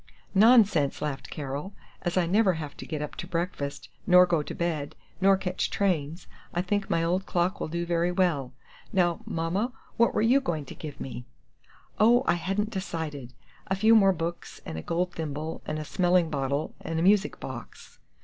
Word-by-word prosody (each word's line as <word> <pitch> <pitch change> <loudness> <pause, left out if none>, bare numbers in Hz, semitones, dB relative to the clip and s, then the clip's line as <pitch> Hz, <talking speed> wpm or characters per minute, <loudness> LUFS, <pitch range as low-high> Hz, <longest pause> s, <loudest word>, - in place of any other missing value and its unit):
"Nonsense," 205 - +5
laughed 145 -3 -4
Carol; 145 +6 -5 0.3
"as 175 0 -2
I 180 - +3
never 195 +2 +3
have 155 -3 -6
to - - -8
get 155 -2 -3
up 150 - -6
to 175 - -5
breakfast, 165 -5 -3 0.2
nor 180 0 +8
go 170 -3 +1
to - - -7
bed, 155 -3 -2 0.3
nor 195 0 +5
catch 185 -1 -2
trains, 170 -4 -1 0.3
I 175 - +1
think 200 +1 -1
my 165 - +1
old 180 +4 0
clock 180 +2 0
will - - -2
do 170 +2 -3
very 170 0 +1
well! 170 -8 +1 0.4
Now, 175 -3 +1
Mama, 185 +9 -1 0.2
what 235 - +3
were - - +2
you 255 +5 +4
going 160 - -2
to - - -9
give 150 -3 -8
me?" 125 -2 -6 0.7
"Oh, 240 +4 +5
I - - +3
hadn't 195 +5 -1
decided. 160 - -5 0.3
A 190 - 0
few 215 +4 +5
more 200 -3 +6
books, 170 -1 -5
and - - -6
a 80 - -4
gold 175 - -1
thimble, 155 0 -4
and 155 - -2
a 155 - -5
smelling 175 -1 +2
bottle, 140 +1 -1
and 165 - -4
a - - +1
music 200 +2 +3
box." - - -9
175 Hz, 190 wpm, -27 LUFS, 155-190 Hz, 0.7 s, nor